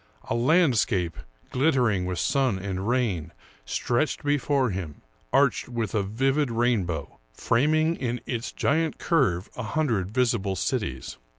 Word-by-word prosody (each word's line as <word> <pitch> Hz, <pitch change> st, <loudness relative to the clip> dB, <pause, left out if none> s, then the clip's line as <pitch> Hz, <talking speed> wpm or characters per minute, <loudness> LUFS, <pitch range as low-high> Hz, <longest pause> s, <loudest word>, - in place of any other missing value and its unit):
A -, -, +3 dB
landscape, 120 Hz, -, +2 dB, 0.4 s
glittering 125 Hz, -, +2 dB
with 90 Hz, -1 st, -3 dB
sun 130 Hz, -, +1 dB
and 95 Hz, +1 st, -4 dB
rain, 115 Hz, -, 0 dB, 0.3 s
stretched 120 Hz, -, -1 dB
before 145 Hz, -3 st, +1 dB
him, 90 Hz, -6 st, -6 dB, 0.3 s
arched -, -, +2 dB
with 115 Hz, -5 st, -3 dB
a 110 Hz, -, +2 dB
vivid 135 Hz, +8 st, 0 dB
rainbow, 105 Hz, -, -1 dB, 0.2 s
framing 155 Hz, -, +2 dB
in 120 Hz, -1 st, -2 dB
its 120 Hz, -1 st, -3 dB
giant 160 Hz, +2 st, 0 dB
curve 115 Hz, -, +1 dB
a -, -, -4 dB
hundred 110 Hz, -, 0 dB
visible 115 Hz, -4 st, 0 dB
cities. 95 Hz, -, -3 dB
120 Hz, 125 wpm, -26 LUFS, 95-135 Hz, 0.4 s, A